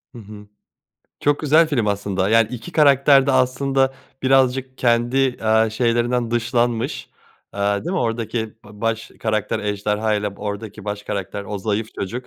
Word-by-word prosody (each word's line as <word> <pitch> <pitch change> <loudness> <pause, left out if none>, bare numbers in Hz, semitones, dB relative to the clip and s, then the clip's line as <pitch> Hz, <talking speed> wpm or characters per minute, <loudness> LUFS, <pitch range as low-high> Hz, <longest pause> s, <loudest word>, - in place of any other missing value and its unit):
Hı - - -8
hı. 105 -1 -12 0.7
Çok 145 0 +1
güzel 155 +2 +4
film 125 -8 0
aslında 100 -2 -1
yani 115 0 +4
2 125 +8 -8
karakter 140 -2 +5
de 140 - +2
aslında 135 +1 +1 0.3
birazcık 130 0 +2
kendi, 125 +2 +2
aaa, 110 0 +3
şeylerinden 120 +1 0
dışlanmış, 120 +2 -1 0.4
aaa, 100 0 0
değil 175 - -3
mi 185 - 0
oradaki 115 -1 -2 0.2
ba 105 0 -14
baş 115 0 -2
karakter 110 -2 -1
ejderhayla, 105 0 -1
b - - -16
oradaki 105 0 -6
baş 105 0 -4
karakter 100 -1 -5
o 105 +1 -5
zayıf 105 +2 -2
çocuk 120 +6 -5
115 Hz, 150 wpm, -21 LUFS, 105-130 Hz, 0.7 s, karakter